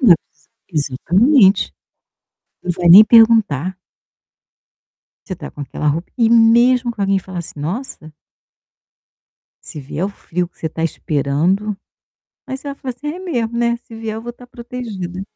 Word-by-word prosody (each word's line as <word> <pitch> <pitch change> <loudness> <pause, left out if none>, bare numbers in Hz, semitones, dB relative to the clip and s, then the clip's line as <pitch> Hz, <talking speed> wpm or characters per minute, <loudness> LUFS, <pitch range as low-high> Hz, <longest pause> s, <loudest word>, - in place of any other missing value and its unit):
Não, 220 -10 +7 0.6
exa 145 -5 -2
exatamente. 200 - +3 0.9
Não 180 - -1
vai 175 0 -1
nem 195 +5 +11
perguntar. 215 - +4 1.5
Você 185 - -5
está - - -9
com - - -12
aquela 145 +2 -5
roupa 160 +4 -1
e 230 - +4
mesmo 235 +2 +4
que 215 - -11
alguém 195 0 +2
fala 185 -1 -8
assim: 170 -3 -8
"Nossa" 165 - -6 1.5
"se 150 - -9
vier 145 +5 -4
o - - -1
frio 180 -3 -4
que - - -38
você - - -4
está 160 +1 -5
esperando", 165 +7 -1 0.7
aí 265 - -4
você 280 +2 -9
vai 280 - -5
falar 260 -3 -6
assim: 290 +4 -7
"É - - -8
mesmo, 240 -11 -3
né, 235 0 +1
se 230 - -13
vier 225 -1 -5
eu 225 - -7
vou 240 - -6
estar 245 +1 -15
protegida". 235 -8 -7
205 Hz, 160 wpm, -18 LUFS, 170-235 Hz, 1.5 s, nem